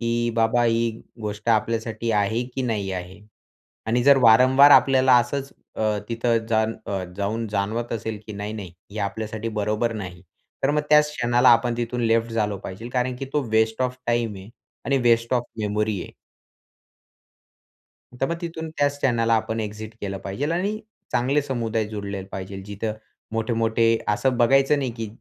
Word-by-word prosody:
की 120 0 0
बाबा, 115 +1 +2
ही 115 0 +2 0.3
गोष्ट 105 +1 -5
आपल्यासाठी 115 +1 0
आहे 105 +3 +1
की 130 - -2
नाही 105 -5 -2
आहे 90 +2 -7 0.7
आणि 120 +2 +1
जर 140 +1 +7
वारंवार 130 +5 +7
आपल्याला 130 -2 +6
असंच 135 +3 -1 0.2
अ, 105 -1 0
तिथं 115 0 +1
जाण 110 0 +2
अ, 95 -2 -2
जाऊन 110 +3 -2
जाणवत 105 +4 -2
असेल 110 -1 -4
की 110 - -7
नाही-नाही, 100 -3 -6 0.2
हे 105 - -7
आपल्यासाठी 110 +2 -3
बरोबर 105 +3 0
नाही. 90 -4 -7 0.4
तर 135 - +3
मग 150 0 +2
त्याच 150 0 +6
क्षणाला 120 0 +3
आपण 120 0 +4
तिथून 120 +1 -2
लेफ्ट 115 0 +1
झालो 105 -3 0
पाहिजे, 105 +5 -8
कारण 125 0 -1
की 135 - -5
तो 150 -1 +1
वेस्ट 110 +2 +2
ऑफ 125 0 -1
टाइम 120 -3 0
आहे 95 +2 -11 0.4
आणि 135 -1 +2
वेस्ट 115 0 +3
ऑफ 120 - +2 0.2
मेमरी 105 -1 -1
आहे. - - -11 2.1
तर 135 - +2
मग 170 - -1
तिथून 160 -1 -5
त्याच 145 0 +1
क्षणाला 115 -4 +2
आपण 110 0 -1
एक्झिट 110 +1 -6
केलं 100 -1 -4
पाहिजेल 115 +12 -3
आणि 200 +5 -1 0.3
चांगले 140 +4 +2
समुदाय 115 -5 -1
जोडलेले 100 -2 -5
पाहिजे. 95 0 -6
जिथे 105 +2 -4 0.4
मोठे-मोठे 115 0 +1
असं 125 +5 +1
बघायचं 135 +4 +4
नाही, 135 -3 -1
की 115 -1 -5
115 Hz, 160 wpm, -23 LUFS, 105-125 Hz, 2.1 s, जर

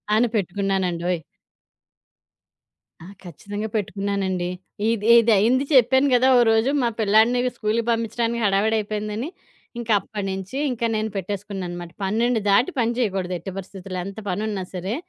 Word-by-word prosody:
అను 235 +3 +4
పెట్టుకున్నానండోయ్! 180 -3 -1 1.8
ఆ! - - -11 0.2
ఖచ్చితంగా 205 +4 -6
పెట్టుకున్నానండి. 195 -3 -2 0.4
ఇది 220 -2 -1
ఇది 230 0 +3
అయింది 250 +7 +3
చెప్పాను 260 +2 +5
కదా! 250 +2 +4
ఓ - - +6
రోజు 225 +4 +2
మా 240 - +2
పిల్లాడిని 220 +4 +4 0.2
స్కూలుకి 220 +1 0
పంపించడానికి 230 +1 -1
హడావిడి 205 +3 +2
అయిపోయిందని, 215 +5 -4 0.5
ఇంకా 235 -1 -3
అప్పటి 205 +1 -6
నుంచి 190 +6 -5
ఇంకా 235 -1 -2
నేను 215 0 -1
పెట్టేసుకున్నాననమాట. 190 -3 -5
12 225 +4 +1
దాటి 235 - +4
పని 230 -1 +2
చేయకూడదు. 190 -6 -1
ఎటు 190 +4 -7
పరిస్థితుల్లో 190 -1 -7
ఎంత 200 +2 -7
పని 185 +4 -2
ఉన్నా 195 -3 -3
సరే! 190 +4 -3
210 Hz, 135 wpm, -23 LUFS, 190-230 Hz, 1.8 s, ఓ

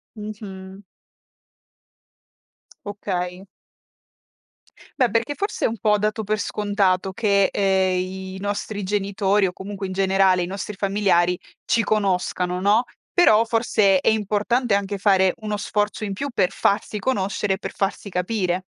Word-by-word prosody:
Mh-mh. 200 -2 -9 2.0
Okay. 185 -2 -4 1.5
Beh, 250 -2 +4
perché 230 +6 0
forse 405 +7 -2
è - - +5
un 225 -2 -5
po' 210 -1 +3
dato 215 +1 -1
per 215 +1 0
scontato 195 -3 0
che, 200 -1 +2
ehm, 190 -2 +2
i 190 +1 -5
nostri 205 +1 -3
genitori 200 0 +1
o - - -3
comunque 195 +1 -6
in - - -6
generale 190 -1 +3
i - - -1
nostri 195 +3 -5
familiari 190 -3 +2 0.3
ci 230 - +2
conoscano, 180 -3 0
no. 210 +5 +4 0.3
Però 230 -11 +5
forse 215 -4 +3
è - - +2
importante 220 +2 +1
anche 200 0 -2
fare 190 -2 +3
uno 210 -2 -3
sforzo 205 +1 -1
in 200 -2 -3
più 280 +8 -4
per 185 -6 +1
farsi 210 +1 0
conoscere 200 -3 0
e 190 - -2
per - - -7
farsi 200 +1 -2
capire. 180 -1 -1
200 Hz, 135 wpm, -22 LUFS, 190-210 Hz, 2.0 s, è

